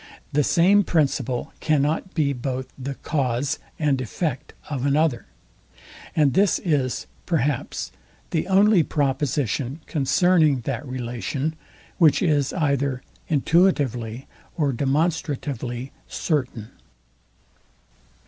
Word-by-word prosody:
The 150 +1 +3
same 190 +8 +4
principle 140 -7 0
cannot 155 +4 0
be 145 -4 +2
both 130 0 -4
the 135 +1 -5
cause 135 -3 -1 0.2
and 145 -4 +1
effect 130 - -3
of 140 -4 -3
another; 140 -3 +1 0.9
and 150 -4 +3
this 195 0 +3
is, 140 -7 -1 0.2
perhaps, 150 -4 -1 0.4
the 160 - 0
only 195 0 +5
proposition 140 -2 -1
concerning 155 -1 +3
that 130 +1 -3
relation, 130 +4 -3 0.5
which 160 +2 +5
is 145 -6 +2
either 140 -5 0 0.3
intuitively 135 - +1 0.3
or 145 -4 +1
demonstratively 135 -3 -1 0.2
certain. 125 - -2
140 Hz, 95 wpm, -23 LUFS, 130-160 Hz, 0.9 s, only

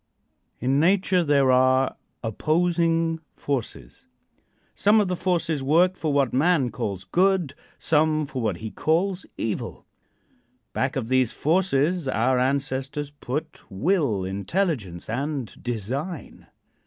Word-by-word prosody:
In 130 +3 +1
nature 185 +1 +3
there 140 -4 +3
are 130 +1 +3 0.3
opposing 165 - +1 0.2
forces. 125 - -5 0.7
Some 210 +2 +4
of 205 -3 +1
the 180 - 0
forces 170 -5 0
work 170 +7 +3
for 155 -4 -2
what 140 -3 +1
man 140 -2 +2
calls 95 -2 -4
good; 180 - +1 0.2
some 155 0 +2
for 135 -2 -5
what 105 -6 -1
he 110 +2 -6
calls 180 +4 0
evil. 110 - -4 0.9
Back 130 +1 -1
of 130 -5 -2
these 130 -1 +2
forces 170 -1 +1
our 125 +1 +2
ancestors 135 +2 -1
put 145 +2 -5
will, 120 - 0
intelligence 100 - -2
and 135 +1 -4
design. 130 - -5
145 Hz, 115 wpm, -24 LUFS, 125-170 Hz, 0.9 s, Some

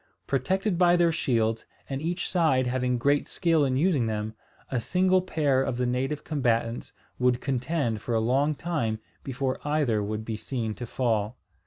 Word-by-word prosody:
Protected 185 - 0
by 175 -1 +5
their 170 -1 +4
shields, 115 -7 0 0.2
and 135 0 -4
each 175 +3 -2
side 155 -8 +2
having 125 0 0
great 140 +4 +2
skill 165 -4 +2
in 130 -2 +1
using 145 -6 +2
them, 110 0 -3 0.4
a 125 -3 0
single 185 +7 +2
pair 150 -7 +1
of 125 - -1
the 125 - 0
native 130 +4 -1
combatants 120 -5 -1 0.3
would 125 -1 +3
contend 130 -4 -1
for 120 - -2
a - - +3
long 135 +7 +2
time 140 -10 -1 0.3
before 130 0 -2
either 145 -8 +1
would 105 +1 -3
be 110 -1 -3
seen 115 -2 -3
to 120 +2 -7
fall. 115 -2 -1
130 Hz, 170 wpm, -27 LUFS, 115-155 Hz, 0.4 s, by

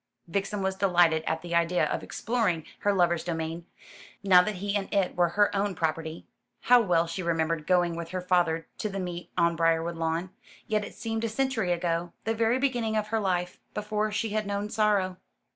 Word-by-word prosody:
Vixen 195 +3 -2
was 190 0 0
delighted 175 -4 +3
at 160 +1 -1
the 170 -1 -5
idea 170 +1 +2
of - - -2
exploring 205 -9 -1
her 205 - +2
lover's 175 -3 +2
domain, 165 0 -4 0.6
now 185 -2 +7
that 210 +3 -2
he 200 +2 -2
and 200 -1 -2
it 195 -3 +1
were 175 -1 +3
her 205 0 +4
own 200 -1 0
property. 160 0 -3 0.4
How 245 0 +6
well 175 -6 +2
she 165 +3 -4
remembered 165 -2 -1
going 175 -2 +3
with 170 0 -5
her 185 - -3
father 175 -3 +1
to 215 - -2
the 195 0 -4
meet 175 -1 -5
on 170 0 +3
Briarwood 165 +1 +1
lawn. 165 +3 -2 0.3
Yet 215 -1 0
it - - -9
seemed 225 0 -3
a 230 - 0
century 225 -5 0
ago 170 0 -1
the 225 - 0
very 225 +2 +2
beginning 240 -5 0
of 210 0 -1
her 225 0 +1
life 180 -3 -1 0.2
before 210 0 -1
she 220 +2 -1
had 215 0 -1
known 205 +1 -3
sorrow. 205 -4 +1
180 Hz, 195 wpm, -28 LUFS, 170-210 Hz, 0.6 s, now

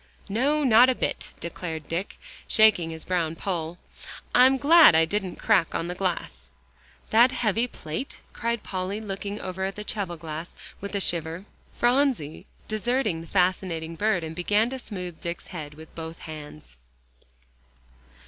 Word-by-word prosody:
"No, 280 +9 +1
not 245 0 +7
a 260 - +2
bit," - - -3
declared 165 -2 -6
Dick, 175 +4 -4 0.3
shaking 215 -7 +5
his 160 -1 -6
brown 170 -3 0
poll. 170 -2 -3 0.6
"I'm 260 +2 +6
glad 310 - +8
I 160 0 +5
didn't 190 +1 -2
crack 165 - +3
the 170 +2 -3
glass." 180 - -3 0.6
"That 235 +3 +6
heavy 235 -1 +1
plate?" 160 - -6
cried 235 -1 -2
Polly, 190 +2 -3
looking 205 0 -5
over 190 0 -4
at 195 +1 -2
the 210 - -6
cheval 195 -5 -4
glass 160 +1 -7 0.2
with 200 +1 -6
a - - +1
shiver. 170 0 -2 0.3
Phronsie 240 - +1 0.2
deserted 215 -4 0
the 165 - -11
fascinating 180 -3 0
bird, 195 -2 +1
and 160 0 -6
began 210 +7 +2
to 265 - -4
smooth 180 -8 -7
Dick's 170 0 -5
head 150 -4 -6
with 160 +1 -13
both 165 0 -7
hands. 145 - -10
185 Hz, 150 wpm, -26 LUFS, 165-220 Hz, 0.6 s, glad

